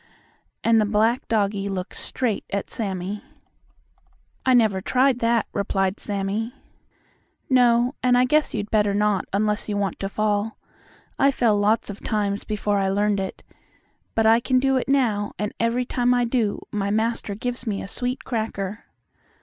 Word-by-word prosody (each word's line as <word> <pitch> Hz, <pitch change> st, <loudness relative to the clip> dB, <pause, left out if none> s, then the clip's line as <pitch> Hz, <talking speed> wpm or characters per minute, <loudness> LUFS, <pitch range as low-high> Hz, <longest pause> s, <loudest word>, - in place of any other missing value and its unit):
and 230 Hz, -1 st, +4 dB
the -, -, +2 dB
black 220 Hz, +5 st, +1 dB
doggie 200 Hz, -3 st, 0 dB
looked 185 Hz, -1 st, -4 dB
straight 240 Hz, -6 st, -2 dB
at 200 Hz, 0 st, -3 dB
Sammie. 195 Hz, 0 st, -3 dB, 1.2 s
"I 260 Hz, -1 st, +4 dB
never 215 Hz, -5 st, +3 dB
tried 255 Hz, +3 st, +2 dB
that," 230 Hz, -1 st, +2 dB
replied 195 Hz, 0 st, 0 dB
Sammie. 205 Hz, +4 st, -3 dB, 1.0 s
"No; 245 Hz, 0 st, +4 dB
and 250 Hz, -1 st, +4 dB
I 250 Hz, -, +5 dB
guess 300 Hz, +4 st, +2 dB
you'd 205 Hz, -1 st, -4 dB
better 210 Hz, -2 st, +2 dB
not, 210 Hz, -2 st, +1 dB
unless 210 Hz, +1 st, 0 dB
you 205 Hz, -, -1 dB
want 200 Hz, -1 st, -2 dB
to 195 Hz, -, -3 dB
fall. 215 Hz, +1 st, -1 dB, 0.6 s
I 275 Hz, -, +5 dB
fell 235 Hz, -5 st, +2 dB
lots 205 Hz, +1 st, +1 dB
of 205 Hz, -, -11 dB
times 205 Hz, -2 st, -1 dB
before 205 Hz, -1 st, 0 dB
I 195 Hz, -1 st, +1 dB
learned 205 Hz, +1 st, +1 dB
it. 190 Hz, -1 st, -5 dB, 0.7 s
But 225 Hz, -, +2 dB
I 225 Hz, +1 st, +6 dB
can 255 Hz, +2 st, +1 dB
do 270 Hz, +1 st, +2 dB
it 260 Hz, -, -1 dB
now, 225 Hz, -7 st, +1 dB
and 210 Hz, 0 st, -3 dB
every 230 Hz, +2 st, +1 dB
time 245 Hz, 0 st, +1 dB
I 245 Hz, 0 st, +2 dB
do 230 Hz, -4 st, -1 dB
my 200 Hz, -1 st, -1 dB
master 220 Hz, -1 st, -1 dB
gives 245 Hz, +2 st, -4 dB
me 200 Hz, -2 st, -2 dB
a -, -, -7 dB
sweet 250 Hz, +5 st, -3 dB
cracker." 215 Hz, -3 st, -3 dB
215 Hz, 165 wpm, -23 LUFS, 200-240 Hz, 1.2 s, I